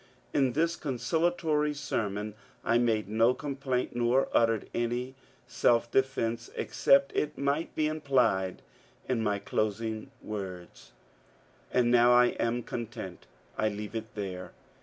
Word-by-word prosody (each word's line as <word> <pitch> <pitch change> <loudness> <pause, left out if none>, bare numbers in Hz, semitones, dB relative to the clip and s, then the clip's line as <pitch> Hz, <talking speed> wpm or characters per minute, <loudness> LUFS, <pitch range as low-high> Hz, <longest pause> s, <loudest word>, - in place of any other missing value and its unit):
In 135 -3 +2
this 165 +4 +1
con 135 -5 -4
ciliatory 160 -1 +1
sermon 105 -7 -2 0.3
I 115 +1 +3
made 115 -3 +1
no 115 +4 +3
complaint 135 -4 -2
nor 120 +3 +2
uttered 115 -2 +2
any 120 +2 -1 0.3
self 120 0 +2
defence 120 -3 0
except 140 0 +3
it 150 0 -1
might 140 +4 -1
be 155 - +1
implied 130 -11 +1 0.4
in 125 -3 0
my 105 -2 +1
closing 110 +2 -2
words: 95 -4 -7 0.4
— - - -32
And 120 -1 +3
now 120 0 +6
I 120 0 +6
am 120 +1 0
content. 115 -7 -6 0.3
I 110 - +3
leaye 105 +1 -6
it 110 -1 -6
there. 95 -3 -5
120 Hz, 135 wpm, -29 LUFS, 110-135 Hz, 0.4 s, now